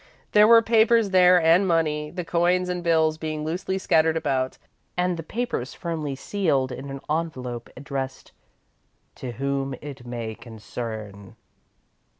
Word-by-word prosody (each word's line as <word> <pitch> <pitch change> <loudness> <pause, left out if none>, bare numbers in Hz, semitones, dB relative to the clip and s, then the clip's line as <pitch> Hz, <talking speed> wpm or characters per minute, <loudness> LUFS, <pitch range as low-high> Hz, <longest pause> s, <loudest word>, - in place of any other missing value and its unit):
There 210 0 +6
were 230 0 +7
papers 225 -2 +4
there 180 -1 +6
and 170 +4 +4
money, 155 -3 +1
the 175 +2 -5
coins 180 +2 +1
and 180 -1 -3
bills 160 -2 +2
being 155 -1 -4
loosely 180 +4 -2
scattered 160 -3 +2
about, 130 -4 -1 0.4
and 180 0 +1
the 165 - -5
papers 190 - -4
firmly 155 -5 -4
sealed 140 -5 0
in 130 +2 -7
an 135 0 -6
envelope 130 -7 -3
addressed 135 0 -5 0.9
"To 125 -2 -6
Whom 135 +1 -2
it 140 -4 -9
May 120 -2 -5
Concern." 110 -3 -8
155 Hz, 140 wpm, -24 LUFS, 130-180 Hz, 0.9 s, were